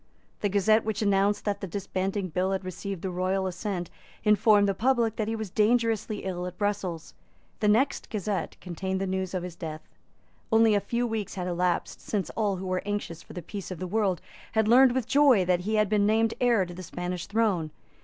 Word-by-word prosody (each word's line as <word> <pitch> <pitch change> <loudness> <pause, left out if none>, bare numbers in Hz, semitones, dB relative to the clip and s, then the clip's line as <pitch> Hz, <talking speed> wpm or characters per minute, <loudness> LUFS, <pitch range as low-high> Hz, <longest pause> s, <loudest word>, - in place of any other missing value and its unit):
The 205 - 0
Gazette 215 +3 +3
which 215 0 -2
announced 200 0 +2
that 200 -1 -1
the 195 - -3
Disbanding 190 +1 -2
Bill 185 +3 0
had 190 -1 -3
received 185 0 -5
the 190 - -2
royal 185 +2 0
assent 185 -1 -3 0.3
informed 210 -1 +5
the 195 - +2
public 230 +1 +1
that 215 - -1
he 225 - -1
was 220 -4 -5
dangerously 220 -1 +1
ill 180 -1 -3
at 180 0 -8
Brussels. 195 -5 -2 0.5
The 215 - +1
next 235 +7 +2
Gazette 205 -2 -3
contained 190 +2 -3
the 195 - -1
news 190 0 -2
of 180 - -2
his 180 -2 -6
death. 155 -2 -7 0.6
Only 225 -1 +5
a 205 - +4
few 235 +5 -1
weeks 220 -4 -3
had 180 -2 -3
elapsed 180 0 -1
since 205 -3 -2
all 210 -3 0
who 185 +1 -6
were 185 0 -1
anxious 205 -5 -4
for - - -13
the 180 - -6
peace 200 +3 -7
of 185 - -5
the 185 - -4
world 195 -1 0 0.3
had 220 -1 +2
learned 250 +2 +6
with 260 -3 0
joy 270 -8 +5
that 180 -1 +2
he 210 +5 -1
had 215 -1 +3
been 205 0 +2
named 225 +1 +2
heir 235 -6 +4
to 175 - -9
the 180 - -8
Spanish 180 0 -5
throne. 200 -7 +1
200 Hz, 210 wpm, -27 LUFS, 185-220 Hz, 0.6 s, learned